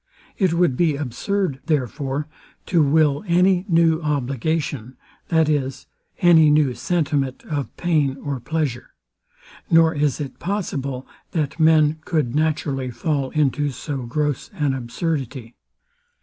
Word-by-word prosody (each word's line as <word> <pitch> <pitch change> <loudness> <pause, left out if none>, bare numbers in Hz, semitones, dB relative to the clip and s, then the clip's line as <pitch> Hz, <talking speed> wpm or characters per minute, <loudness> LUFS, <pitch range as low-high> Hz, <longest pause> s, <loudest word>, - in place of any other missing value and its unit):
It 185 -5 +1
would 170 -6 +2
be 160 0 +2
absurd, 145 - -2
therefore, 140 0 -1 0.4
to 170 -3 +2
will 150 0 +3
any 180 +1 +3
new 165 -1 +3
obligation, 140 -2 -2 0.3
that 160 -2 +3
is, 135 -4 -1 0.4
any 165 -3 +6
new 150 -3 +3
sentiment 140 -1 -1
of 145 -3 -4
pain 150 -6 +1
or 140 -1 -4
pleasure; 145 -3 -3 0.7
nor 165 0 +5
is 145 -3 0
it 140 -3 -6
possible, 140 -9 -3 0.3
that 155 -2 -2
men 155 -1 +4
could 150 -9 -1
naturally 145 -4 0
fall 140 +1 -2
into 145 0 +1
so 140 +2 -5
gross 145 +1 -2
an 145 -3 0
absurdity. 130 -2 -4
150 Hz, 120 wpm, -22 LUFS, 135-160 Hz, 0.7 s, any